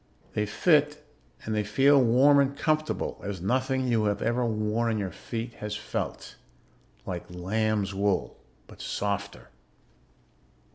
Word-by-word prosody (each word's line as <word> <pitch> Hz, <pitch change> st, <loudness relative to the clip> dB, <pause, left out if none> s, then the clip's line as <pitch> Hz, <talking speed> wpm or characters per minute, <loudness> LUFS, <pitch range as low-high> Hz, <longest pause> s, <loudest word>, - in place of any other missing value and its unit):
They 105 Hz, 0 st, 0 dB
fit, 150 Hz, -, +2 dB, 0.4 s
and 110 Hz, -, -2 dB
they 105 Hz, 0 st, +1 dB
feel 135 Hz, +7 st, +4 dB
warm 130 Hz, +4 st, +5 dB
and 140 Hz, 0 st, +1 dB
comfortable 155 Hz, 0 st, -1 dB
as 100 Hz, -2 st, -4 dB
nothing 130 Hz, +6 st, 0 dB
you 115 Hz, -3 st, +2 dB
have 105 Hz, -1 st, 0 dB
ever 120 Hz, +2 st, +1 dB
worn 110 Hz, 0 st, 0 dB
on 110 Hz, -, 0 dB
your 100 Hz, -3 st, -3 dB
feet 115 Hz, 0 st, -6 dB
has 105 Hz, 0 st, -3 dB
felt. 105 Hz, -, -5 dB, 0.7 s
Like 90 Hz, -2 st, -5 dB
lamb's 100 Hz, +3 st, -1 dB
wool, 100 Hz, 0 st, -1 dB, 0.3 s
but -, -, -14 dB
softer. 100 Hz, 0 st, -3 dB
110 Hz, 135 wpm, -27 LUFS, 100-130 Hz, 0.7 s, warm